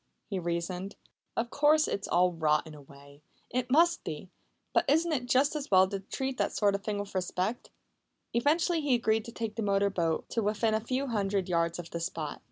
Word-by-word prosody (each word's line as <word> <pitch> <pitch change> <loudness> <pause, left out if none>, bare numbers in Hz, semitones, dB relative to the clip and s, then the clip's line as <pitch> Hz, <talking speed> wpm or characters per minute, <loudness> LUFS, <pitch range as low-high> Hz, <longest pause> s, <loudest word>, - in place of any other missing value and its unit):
he 195 - -1
reasoned. 175 +3 -3 0.4
"Of 235 +1 -1
course 300 +1 +4
it's 200 - -3
all 180 0 +3
rot 155 -2 +1
in 160 - -10
a 150 - -11
way 140 +1 -16 0.3
it 250 +1 -1
must 335 +5 +4
be. - - -6 0.4
But - - +2
isn't 325 +4 +3
it 250 -5 -1
just 270 +4 +3
as 290 -2 -4
well 190 -1 +6
to 195 - -3
treat 265 +7 -4
that - - 0
sort 205 -2 +3
of 200 0 -3
thing 210 -1 -2
with 205 0 -5
respect?" 185 +4 -2 0.6
Eventually 320 +7 +2
he 285 -4 +2
agreed 220 -2 +1
to 235 - -8
take 225 -2 -5
the - - -1
motor 200 -1 +2
boat 165 -4 -1
to 230 - -1
within 215 +1 +1
a 220 - +2
few 255 +5 -2
hundred 200 -6 -1
yards 170 -1 0
of 170 -1 -8
the 170 - -3
spot. 165 -3 -4
205 Hz, 210 wpm, -30 LUFS, 180-255 Hz, 0.6 s, well